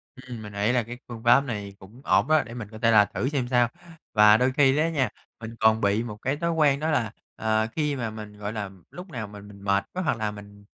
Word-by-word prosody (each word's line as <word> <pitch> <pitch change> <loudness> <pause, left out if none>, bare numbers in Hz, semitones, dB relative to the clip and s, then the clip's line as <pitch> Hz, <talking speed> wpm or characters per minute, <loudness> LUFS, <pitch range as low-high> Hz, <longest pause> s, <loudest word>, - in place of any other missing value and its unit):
Ừm, 125 -3 -9
mình 105 -1 -9
nghĩ 100 +3 +1
là 125 -1 +2
cái 120 +2 -8
phương 115 -2 -9
pháp 120 +3 +6
này 105 -6 -5
cũng 105 +7 -15
ổn - - +3
đó 155 -1 +4
để 115 - -9
mình 120 -4 -6
có 110 - -9
thể 115 - +4
là 105 -2 +7
thử 130 - -2
xem 135 -4 -1
sao. 125 -1 +3 0.5
Và 105 0 +7
đôi 125 +2 +2
khi 135 -2 +5
đó 155 +2 +3
nha, 140 -7 0 0.3
mình 115 0 -8
còn 110 0 +4
bị 100 +3 +2
một 105 -3 -7
cái 135 +2 0
thói 170 +1 -1
quen 150 -4 +3
đó 160 +2 -1
là, 115 -8 0 0.2
ờ, 110 0 +1
khi 150 -2 -1
mà 120 -4 -3
mình, 105 -1 -9
gọi 105 +1 -5
là, 105 -3 -4 0.2
lúc 180 +2 -9
nào 115 -8 -5
mà 105 0 -11
mình 100 0 -13
mệt 100 0 +1
quá 185 - -2
hoặc 135 - 0
là 110 -1 -2
mình, 100 0 -13
115 Hz, 265 wpm, -26 LUFS, 105-130 Hz, 0.5 s, là